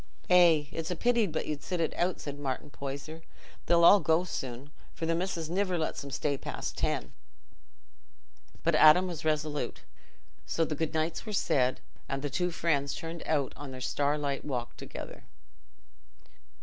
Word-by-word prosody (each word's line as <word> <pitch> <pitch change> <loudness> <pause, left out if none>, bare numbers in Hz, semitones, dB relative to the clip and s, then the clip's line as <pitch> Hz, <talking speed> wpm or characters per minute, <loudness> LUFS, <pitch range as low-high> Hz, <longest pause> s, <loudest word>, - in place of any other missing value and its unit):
"Eh! 170 -4 +7
It's 165 -1 -4
a 180 - -1
pity 235 +3 +2
but 160 - -3
you'd 150 -2 -4
sit 180 -2 -3
it 165 - 0
out," 180 +1 0
said 145 -1 -6
Martin 140 0 -4
Poyser. 140 +4 -6 0.5
"They'll 170 -1 +5
all 200 +4 +9
go 165 -1 +2
soon, 135 -4 -6 0.2
for 165 - -3
th' 165 0 +1
missis 170 -2 -2
niver 185 +1 0
lets 160 -2 -2
'em 140 - -7
stay 140 0 -1
past - - -5
ten." - - -1 1.5
But - - +2
Adam 155 +4 +7
was 175 -4 -5
resolute, 150 -1 -1 0.7
so 165 - +1
the 155 - -3
good 160 +1 -2
nights 160 +6 -1
were 215 - -4
said, 130 -9 +1 0.3
and 135 0 -3
the 145 - -2
two 180 +5 0
friends 145 -5 0
turned 165 0 -6
out 145 -4 +1
on 145 -1 -8
their 130 -1 -7
starlight 145 +1 0
walk 125 -4 -4
together. - - -9
155 Hz, 165 wpm, -30 LUFS, 140-170 Hz, 1.5 s, all